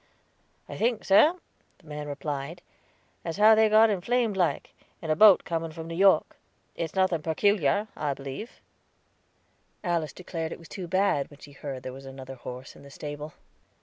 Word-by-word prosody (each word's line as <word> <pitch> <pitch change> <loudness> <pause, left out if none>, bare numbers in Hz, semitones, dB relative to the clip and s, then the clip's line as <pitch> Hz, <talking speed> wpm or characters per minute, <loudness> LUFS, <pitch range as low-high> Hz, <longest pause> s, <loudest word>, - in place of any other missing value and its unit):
"I - - -7
think, 230 -1 0
sir," 295 - +6 0.4
the 180 - -25
man 150 -1 -6
replied, 145 +3 -5 0.6
"as 165 0 -4
how 215 +2 +7
they 220 0 +5
got 215 +1 +6
inflamed 225 +3 0
like, 180 -3 0 0.3
in 160 - -7
the 155 - +3
boat 205 +2 +7
coming 165 -1 -3
from 160 +1 -8
New 165 - -6
York. 195 +2 +4 0.4
It's 165 +1 -4
nothing 185 -4 +2
perticalar, 190 +3 +1
I 145 -2 -2
believe." 140 - -8 1.2
Alice 170 -4 -1
declared 165 -3 -5
it - - -9
was 165 - -15
too 185 -3 -6
bad, 185 -6 +1
when 145 - -15
she 145 - -13
heard 140 -2 -7
there 130 - -6
was 135 +1 -11
another 135 0 -9
horse 125 +1 -9
in - - -15
the 140 - -13
stable. 145 +1 -7
165 Hz, 175 wpm, -27 LUFS, 145-195 Hz, 1.2 s, how